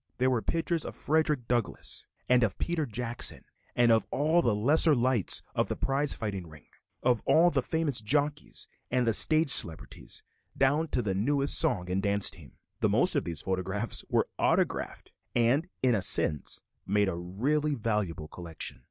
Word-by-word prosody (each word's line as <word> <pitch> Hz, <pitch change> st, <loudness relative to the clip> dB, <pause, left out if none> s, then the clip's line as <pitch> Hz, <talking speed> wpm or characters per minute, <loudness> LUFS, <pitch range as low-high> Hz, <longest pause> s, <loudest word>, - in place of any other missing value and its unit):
There 130 Hz, +1 st, +1 dB
were 120 Hz, -3 st, 0 dB
pictures 165 Hz, +2 st, -2 dB
of -, -, -8 dB
Frederick 150 Hz, -5 st, -1 dB
Douglass 120 Hz, -3 st, -3 dB, 0.2 s
and 125 Hz, 0 st, +3 dB
of 105 Hz, -5 st, -1 dB
Peter 165 Hz, -4 st, -2 dB
Jackson, 120 Hz, +1 st, -3 dB, 0.3 s
of 115 Hz, -2 st, +3 dB
all 155 Hz, +5 st, +1 dB
the 120 Hz, -7 st, 0 dB
lesser 145 Hz, +8 st, +6 dB
lights 125 Hz, -4 st, +1 dB
of -, -, 0 dB
the -, -, -2 dB
prize 135 Hz, +1 st, -1 dB
fighting 100 Hz, -6 st, -5 dB
ring, 75 Hz, -2 st, -16 dB, 0.4 s
of 120 Hz, -3 st, +1 dB
all 175 Hz, +2 st, +4 dB
the 135 Hz, -, 0 dB
famous 150 Hz, -5 st, 0 dB
jockeys 145 Hz, +6 st, -2 dB, 0.2 s
and 125 Hz, 0 st, 0 dB
the 115 Hz, -, +1 dB
stage 155 Hz, +4 st, +4 dB
celebrities, 80 Hz, -10 st, -1 dB, 0.3 s
down 145 Hz, +4 st, +1 dB
to 125 Hz, -5 st, -2 dB
the 100 Hz, -2 st, -2 dB
newest 140 Hz, +8 st, +3 dB
song 115 Hz, -, +2 dB
and 95 Hz, +1 st, -1 dB
dance 100 Hz, 0 st, +2 dB
team. 75 Hz, -9 st, -16 dB, 0.3 s
The -, -, +1 dB
most -, -, +2 dB
of -, -, -1 dB
these 85 Hz, -3 st, -2 dB
photographs 95 Hz, +4 st, -2 dB
were -, -, +1 dB
autographed -, -, -1 dB, 0.2 s
and, 125 Hz, +8 st, +2 dB, 0.2 s
in 125 Hz, -2 st, +3 dB
a 105 Hz, -, 0 dB
sense, 75 Hz, -4 st, +2 dB, 0.3 s
made 100 Hz, +1 st, +1 dB
a 95 Hz, -, -2 dB
really 135 Hz, -, -2 dB
valuable 105 Hz, -, -3 dB
collection. 85 Hz, -2 st, -5 dB
120 Hz, 170 wpm, -28 LUFS, 100-145 Hz, 0.4 s, lesser